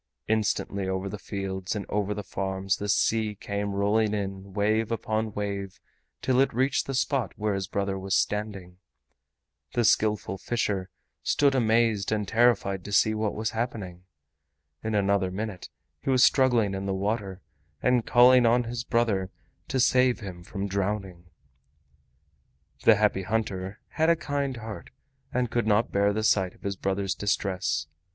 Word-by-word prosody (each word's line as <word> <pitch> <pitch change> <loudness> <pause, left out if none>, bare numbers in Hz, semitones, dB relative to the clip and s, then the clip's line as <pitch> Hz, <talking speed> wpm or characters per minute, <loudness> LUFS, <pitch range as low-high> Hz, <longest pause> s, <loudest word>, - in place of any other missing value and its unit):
Instantly 100 -3 0
over 95 +1 -2
the 100 +1 -6
fields 95 -2 -4
and 105 - -3
over 105 0 -1
the 105 - -5
farms 95 0 -2
the 105 - -4
sea 110 0 +1
came 100 0 -3
rolling 105 +2 +2
in 100 -1 -5
wave 110 +3 +1
upon 110 -1 -1
wave 100 -2 -4 0.4
till 130 -1 +2
it 135 - +3
reached 135 +2 +1
the 135 - -2
spot 130 -4 0
where 105 -1 0
his 95 -1 -2
brother 100 -1 -2
was 95 0 -1
standing. 100 -4 -2 0.9
The 120 -1 +2
Skillful 105 -3 +2
Fisher 100 -4 -1 0.3
stood 140 -1 +2
amazed 115 -4 +2
and 105 -2 0
terrified 110 -4 +2
to 100 - -6
see 110 +2 +4
what 110 -1 -1
was 110 +1 -2
happening. 100 -6 -4 0.8
In 110 -1 -1
another 100 -2 +2
minute 100 0 -5 0.3
he - - -3
was 130 -1 +5
struggling 120 -7 +4
in 95 0 -3
the 95 - -1
water 100 -1 -2 0.4
and 125 -2 +3
calling 125 +1 +6
on 120 +2 +4
his 120 0 -4
brother 110 -6 +1 0.4
to 130 - -1
save 125 -1 +4
him 90 -5 -8
from 100 +3 -4
drowning. 95 -2 -3 1.6
The 110 - +8
Happy 105 -2 +2
Hunter 105 -2 -2
had 160 +1 +1
a 170 - +5
kind 145 -4 -2
heart 110 -1 -8 0.4
and 125 -4 -1
could 120 -2 0
not 105 +2 +2
bear 100 +1 +3
the 110 +1 -2
sight 95 -4 +2
of - - -23
his 100 -1 -2
brother's 95 0 -1
distress. 95 -7 -1
105 Hz, 160 wpm, -27 LUFS, 95-115 Hz, 1.6 s, The